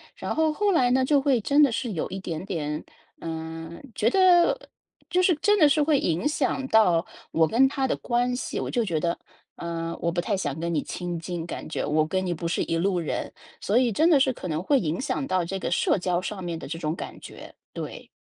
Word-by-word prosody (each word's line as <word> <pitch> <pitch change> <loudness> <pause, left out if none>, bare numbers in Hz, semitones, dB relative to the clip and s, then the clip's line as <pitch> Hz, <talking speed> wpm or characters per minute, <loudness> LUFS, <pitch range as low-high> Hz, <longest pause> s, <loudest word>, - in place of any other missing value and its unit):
然 - - -4
后 315 0 +2
后 410 +4 +1
来 250 -9 +3
呢， 260 +1 +3
就 285 +1 +4
会 270 -3 +2
真 285 +7 +3
的 280 - +4
是 235 0 -2
有 160 - -2
一 190 - -5
点 170 -2 -5
点， 150 -5 -3 0.4
呃， 160 0 -6 0.3
觉 225 - +2
得 370 - +4 0.4
就 360 +2 +2
是 360 -2 +4
真 415 0 +4
的 305 - +7
是 300 +1 +3
会 295 -2 +3
影 170 - 0
响 270 -2 -1
到 185 -8 +4 0.3
我 160 -1 +3
跟 250 +7 +4
她 270 -1 -1
的 - - 0
关 245 0 0
系。 255 - -4
我 - - -3
就 240 - +1
觉 165 -6 -1
得， 170 +2 -1 0.4
呃， 165 0 -4
我 170 - 0
不 175 - -2
太 205 +3 -1
想 145 -4 -3
跟 170 0 -2
你 150 - +1
亲 175 -2 -4
近， 170 0 -5
感 170 - -6
觉 155 - -3
我 155 +1 +2
跟 185 +3 -1
你 175 - -1
不 170 0 -4
是 165 - -1
一 165 - -1
路 180 +1 +1
人， 165 - -3 0.3
所 210 - +1
以 250 -2 +3
真 320 - +3
的 295 - +6
是 265 -1 +3
可 185 - -7
能 155 -1 -2
会 280 +6 +3
影 165 -4 -2
响 275 0 -2
到 185 -5 +1
这 195 +3 -3
个 - - -2
社 175 - +2
交 180 -1 0
上 190 0 -5
面 170 -1 -3
的 - - -8
这 165 +4 -5
种 155 -1 -2
感 - - -8
觉， - - -11 0.2
对。 - - -7
190 Hz, 255 characters per minute, -25 LUFS, 165-265 Hz, 0.4 s, 的